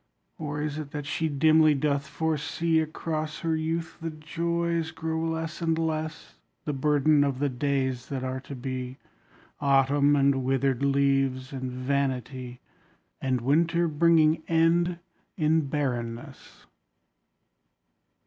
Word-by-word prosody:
Or 150 -1 -3
is 150 0 -3
it 150 -2 -6
that 145 -2 -4
she 160 +2 -1
dimly 155 +1 +4
doth 140 0 0
foresee 160 +2 0
Across 155 -1 -3
her 165 -1 0
youth 160 +2 -3
the 165 - -2
joys 170 +1 -2
grow 160 0 -3
less 165 0 -3
and 165 -1 +1
less 160 0 -3 0.3
The 150 - -1
burden 145 +1 +3
of 140 -2 -1
the 145 +1 0
days 130 -1 -1
that 135 -2 -3
are 130 0 -3
to 140 +1 -9
be: 130 0 -5 0.6
Autumn 140 +1 +3
and 140 -1 +2
withered 135 0 +1
leaves 135 -1 +1
and 130 -1 -4
vanity, 130 -1 -2 0.6
And 130 -2 0
winter 170 +6 +2
bringing 160 0 +4
end 170 +1 +2 0.4
in 155 -2 +2
barrenness. 120 -5 -4
150 Hz, 125 wpm, -27 LUFS, 135-160 Hz, 0.6 s, dimly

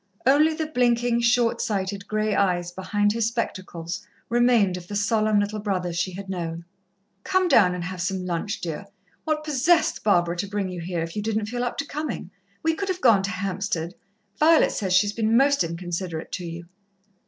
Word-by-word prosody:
Only 300 +4 +4
the 315 - -2
blinking, 240 -4 +1
short 235 0 +2
sighted 200 -2 -2
grey 215 0 0
eyes 175 -3 +1
behind 205 +3 0
his 230 -1 +1
spectacles 185 -7 -4 0.3
remained 235 -6 +3
of 175 -1 -8
the 205 - -5
solemn 215 +1 +2
little 205 +1 -1
brother 185 -4 -2
she 170 +2 -1
had 195 +2 -7
known. 170 -3 -4 0.6
"Come 375 -1 +2
down 185 - +5
and 175 - -4
have 180 0 -5
some 185 0 -2
lunch, 180 +4 -3
dear. 170 +4 -5 0.4
What 310 -1 0
possessed 310 +3 +2
Barbara 175 -4 +3
to 200 - -2
bring 200 -1 -2
you 180 -2 -6
here, 170 0 -3
if 165 0 -7
you 210 - -1
didn't 215 0 -1
feel 245 +1 -2
up 245 - -3
to 280 - -2
coming? 295 - -5 0.3
We 325 0 +2
could 395 +4 -3
have 365 -1 -1
gone 225 - +5
to 195 - -2
Hampstead. 185 -2 -3 0.5
Violet 320 +1 +5
says 190 -3 -1
she's 205 +2 +3
been 225 0 +2
most 280 -1 +4
inconsiderate 170 0 -4
to 180 - -4
you." 170 +1 -7
205 Hz, 190 wpm, -24 LUFS, 180-240 Hz, 0.6 s, down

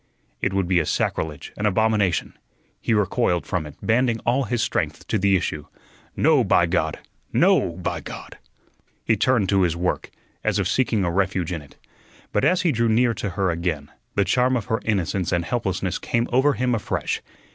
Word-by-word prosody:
It - - +1
would 95 -2 0
be 90 -1 +3
a 80 - 0
sacrilege, 75 -3 -2
an 105 - +1
abomination. 105 -3 +1 0.5
He 115 - +1
recoiled 100 -3 +1
from 80 -3 -2
it, 75 - -11
banding 115 0 +2
all 130 +3 +2
his 120 +1 0
strength - - -2
to 110 - +1
the 100 +1 +3
issue. 75 -4 -2 0.5
"No, - - +4
by - - +4
God! - - 0 0.3
No, 85 - +3
by 90 +1 -3
God!" - - -9 0.7
He 115 - +3
turned 110 -1 +2
to 100 -1 +3
his 85 -3 +2
work, 90 +1 -2 0.3
as 110 -2 +1
if 95 -3 +1
seeking 110 0 +1
a 85 - 0
refuge 95 -1 0
in 85 -3 -3
it. 70 - -17 0.6
But - - +1
as 185 0 +3
he 170 - +3
drew 115 -3 +1
near 115 +2 +3
to 100 -1 -4
her 95 0 0
again, 85 -4 -3 0.2
the 100 - +2
charm 125 +6 +2
of 115 - -4
her 110 - -1
innocence 95 -4 0
and 85 -2 0
helplessness 95 -6 -2
came 115 0 0
over 135 +3 +4
him 125 -1 0
afresh. 110 - -2
100 Hz, 190 wpm, -23 LUFS, 90-115 Hz, 0.7 s, No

